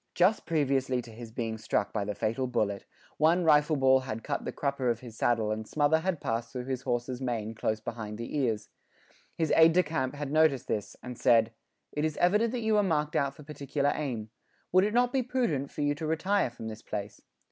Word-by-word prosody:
Just 185 +5 +3
previously 135 -5 +1
to 115 - -12
his 115 0 -10
being 110 -1 -3
struck 105 - -1
by 100 - -1
the 105 0 -3
fatal 115 +5 -1
bullet, 100 -5 -1 0.3
one 165 +4 +4
rifle 150 -1 +4
ball 130 -1 +5
had 115 -4 -5
cut - - -3
the - - -2
crupper 140 -3 -1
of 115 -1 -1
his 120 -3 -10
saddle 115 -2 +1
and 110 0 -3
smother 155 +1 +2
had 175 -1 -1
passed 115 -1 -2
through 125 -1 -5
his 130 -1 -3
horse's 125 0 -2
mane 115 -4 -2
close 110 0 -1
behind 110 -1 -6
the 115 +5 -6
ears. 115 -7 -1 0.7
His 160 -1 +1
aide 165 0 +7
de 180 +1 +4
camp 145 -4 -2
had 145 -1 -4
noticed 155 -5 +3
this, 105 -1 -3
and 125 -1 -7
said: 115 -3 +4 0.4
"It 150 - -2
is 155 -1 -1
evident 210 +6 +3
that 245 - -2
you 220 -1 +3
are - - +5
marked 150 -5 0
out 140 -1 +1
for 150 - -12
particular 145 -1 -1
aim; 115 -8 -4 0.4
would 185 +2 +5
it 210 +2 -1
not 245 0 +3
be 265 - +2
prudent; 235 - -1
for - - -6
you 145 0 +2
to 155 +2 -5
retire 185 +2 +1
from 120 -2 -8
this 110 0 -7
place?" 100 -2 -6
135 Hz, 220 wpm, -29 LUFS, 115-155 Hz, 0.7 s, aide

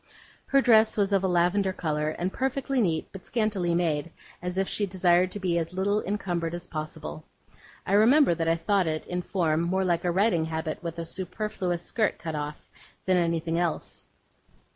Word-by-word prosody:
Her 275 - +4
dress 220 -2 +5
was 200 -1 +1
of 195 -1 +3
a - - +2
lavender 180 +2 +2
colour, 155 -4 -1
and 185 +2 -2
perfectly 270 0 0
neat; 165 -6 0
but 195 - -10
scantily 205 -7 0
made, 165 -2 0 0.3
as 180 +1 -4
if 195 0 +1
she 205 - -1
desired 180 -1 +3
to 205 - -5
be 175 -3 +1
as 165 +1 -4
little 200 +3 +1
encumbered 175 -4 -2
as 175 0 -7
possible. 115 - -6 0.6
I 195 - -1
remember 230 - +6
that 165 -1 -2
I 165 - +3
thought 185 +2 +1
it, 155 0 -2
in 180 0 -3
form, 165 -4 0
more 185 +3 0
like 175 -2 +1
a 175 - +1
riding 175 -2 +2
habit 160 -1 -4
with 170 -2 -5
the 170 - -5
superfluous 185 -1 -3
skirt 220 +2 0
cut 160 -2 -5
off, 150 0 -5 0.4
than 185 -1 +3
anything 165 -1 0
else. 170 -3 -3
180 Hz, 185 wpm, -27 LUFS, 165-200 Hz, 0.6 s, remember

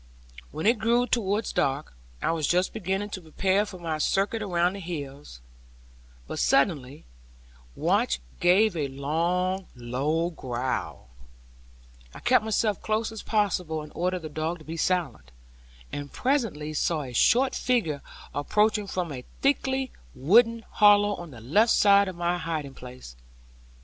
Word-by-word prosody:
When 155 +2 -5
it 225 +1 +4
grew 235 +3 +2
towards 210 -3 -1
dark, 135 - -1 0.3
I - - +2
was 160 -3 -1
just 180 +1 +1
beginning 200 0 -2
to 185 - -5
prepare 190 +5 0
for 190 - -9
my 165 -3 -3
circuit 200 +7 +1
around 180 -3 +1
the 200 - -7
hills; 145 - -7 0.8
but - - -5
suddenly 140 -2 +1 0.7
Watch 65 -1 +1 0.2
gave 195 +3 +4
a 150 -4 -1
long 170 +7 -1
low 140 +8 -1
growl; 125 - -4 1.1
I - - -8
kept 250 -3 +3
myself 215 -1 0
close 220 +1 -1
as 220 - -7
possible, 180 -7 0
and 150 - -11
ordered 180 0 -2
the 155 - -5
dog 155 +3 -3
to 155 - -16
be 160 - -6
silent, 165 - -1 0.6
and 145 -1 -6
presently 225 - -1
saw 155 0 0
a 125 -2 -8
short 255 - +4
figure 165 - 0 0.3
approaching 210 +7 +1
from 180 -4 -3
a 125 -3 -6 0.2
thickly 265 -1 +1 0.2
wooded 230 - +4
hollow 205 0 +5
on 175 -3 -7
the 120 -6 -12
left 205 - +3
side 200 -1 +5
of 185 - -5
my 175 +1 -1
hiding 155 -5 -4
place. 125 - -11
175 Hz, 145 wpm, -26 LUFS, 150-210 Hz, 1.1 s, hollow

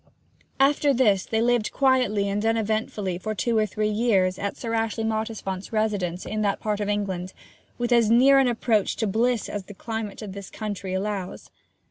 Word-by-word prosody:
After 280 0 +3
this 210 -7 +3
they 225 0 +1
lived 240 -2 +1
quietly 250 -7 +2
and 200 +1 -1
uneventfully 215 -4 -1
for 215 +3 -4
two 235 +2 0
or 215 -1 +3
three 210 +2 -1
years 205 -4 +1
at 200 - -3
Sir 230 -1 -4
Ashley 225 0 -1
Mottisfont's 220 -4 -3
residence 205 -5 -1
in 215 0 -3
that 200 -2 0
part 210 -1 -2
of 205 -1 -2
England, 190 -3 -2 0.4
with 240 0 -2
as 235 -3 +4
near 265 +4 +6
an 265 - +4
approach 225 -3 +1
to 220 - -1
bliss 230 +3 +1
as 205 -2 -5
the 205 - -11
climate 220 0 -5
of 200 -3 -7
this 200 -1 -8
country 200 -3 -5
allows. 195 -1 -4
215 Hz, 180 wpm, -25 LUFS, 200-230 Hz, 0.4 s, near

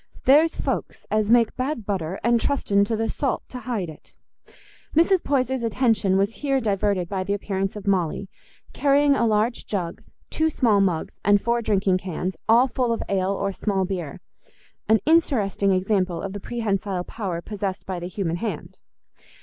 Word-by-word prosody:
There's 305 +5 +5
folks - - -3
as 215 -1 +1
make 235 -1 +4
bad 255 -3 -3
butter 190 -3 -3
and 235 -1 +3
trusten 205 -8 +2
to 225 - -1
the 225 +1 0
salt 265 +3 -2
t' 250 - -7
hide 235 -8 -3
it." 155 - -13 0.8
Mrs. 340 +3 +4
Poyser's 265 -2 0
attention 225 -4 +2
was 200 +3 +1
here 275 -2 +1
diverted 200 -5 0
by 190 +1 -2
the 200 +2 -1
appearance 195 -1 -3
of 210 -1 -8
Molly, 190 -1 0 0.5
carrying 285 0 +3
a 235 - +2
large 220 +2 0
jug, 180 -5 -3 0.3
two 315 0 +1
small 225 -9 +2
mugs, 180 -5 -1
and 205 0 +5
four 235 +3 0
drinking 195 -4 +1
cans, 185 0 -3 0.2
all 240 +4 +6
full 250 -2 -1
of 230 - -1
ale 195 0 +1
or 195 0 -2
small 195 -1 -1
beer—an 185 +4 -4
interesting 235 -12 +2
example 185 -2 +1
of 195 -1 -4
the 205 - -5
prehensile 200 -4 -2
power 185 -4 -4
possessed 195 0 -4
by 185 -2 -4
the 175 - -5
human 180 -2 -2
hand. 195 -5 -5
205 Hz, 165 wpm, -24 LUFS, 190-235 Hz, 0.8 s, all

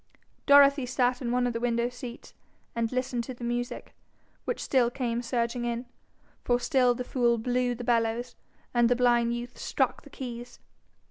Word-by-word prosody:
Dorothy 280 -2 +6
sat 250 0 +1
in 240 -2 -2
one 250 0 +2
of 245 - 0
the 230 - -2
window 235 0 +1
seats, 245 0 -9 0.4
and 230 -1 -1
listened 255 -1 -1
to 255 - -7
the 240 - -10
music, 240 0 -3 0.5
which - - -2
still 250 -3 +2
came 240 -2 -2
surging 240 0 -1
in, 240 +1 -2 0.6
for 245 0 +2
still 250 -2 +3
the 250 - -3
fool 240 -2 +1
blew 245 +1 0
the 245 - -7
bellows, 235 0 0 0.4
and 240 -1 +4
the 245 - +4
blind 240 -1 +3
youth 240 +1 -7
struck - - 0
the - - -15
keys. 240 -2 -8
245 Hz, 175 wpm, -28 LUFS, 235-250 Hz, 0.6 s, Dorothy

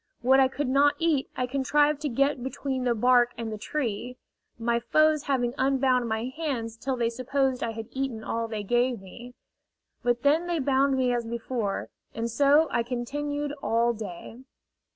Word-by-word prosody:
What 265 +2 +5
I 265 - +6
could 275 +1 -3
not 280 +3 +4
eat 320 -4 +1
I 255 - +1
contrived 290 +3 +1
to 300 - -1
get 275 +2 +1
between 260 0 -3
the 240 -1 +2
bark 245 +1 +4
and 230 -1 -4
the - - -5
tree 245 -1 -3 0.4
my 235 0 0
foes 310 +4 +2
having 245 -3 0
unbound 260 -2 +2
my 220 0 -1
hands 255 -8 -3
till 260 +3 -3
they 235 -1 0
supposed 260 +1 -1
I 230 - -2
had 225 0 -6
eaten 260 -5 -3
all 230 0 -2
they 215 -2 -4
gave 240 +2 +1
me. 235 +6 -12 0.7
But 240 0 0
then 310 +5 +3
they 345 -1 0
bound 270 -1 +2
me 250 -1 +2
as 235 -1 -2
before, 230 -3 -3 0.3
and 230 +1 -2
so 285 +5 +4
I 235 - +1
continued 285 +5 -3
all 235 -1 +2
day. 210 +1 -8
255 Hz, 175 wpm, -27 LUFS, 235-280 Hz, 0.7 s, I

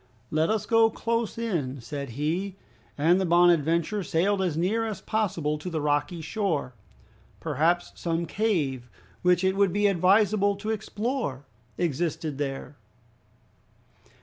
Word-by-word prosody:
"Let 155 +1 +2
us 215 -1 0
go 225 0 +5
close 230 0 -2
in," 165 - -2
said 140 +3 -6
he. 175 +6 -1 0.4
And 170 +6 +4
the - - +1
"Bonadventure" 170 +2 +3
sailed 190 +3 +1
as 175 -5 0
near 200 +7 +1
as 220 -2 -3
possible 165 -9 -1
to 180 - -5
the 165 -2 -2
rocky 150 +3 0
shore. 160 - -2 0.7
Perhaps 170 +5 +1
some 170 0 -2
cave, 150 - -1 0.3
which 180 0 +3
it 190 0 +2
would 200 -2 +3
be 205 +2 +1
advisable 200 +2 +3
to 215 +2 -4
explore, 215 - -3 0.3
existed 160 -2 -2
there? 140 0 -4
175 Hz, 130 wpm, -27 LUFS, 150-205 Hz, 0.7 s, go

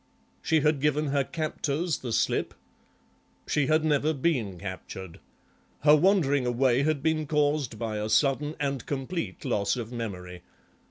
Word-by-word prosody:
"She 160 -1 +2
had 150 -2 +2
given 150 0 +1
her 140 0 +2
captors 155 +1 -2
the 125 - -5
slip?" - - 0 0.9
"She 145 -3 +1
had 155 +1 +2
never 150 0 +2
been 130 - 0
captured. 95 -1 -8 0.6
Her 150 0 +7
wandering 150 -7 +3
away 125 +1 +2
had 145 -1 0
been 155 -1 +1
caused 145 -5 +1
by 110 -2 -3
a 105 +1 -2
sudden 145 +6 +2
and 140 -3 -2
complete 145 +4 -4
loss 100 -6 +1
of 120 -2 -5
memory. 90 -7 -6
140 Hz, 145 wpm, -27 LUFS, 115-155 Hz, 0.9 s, Her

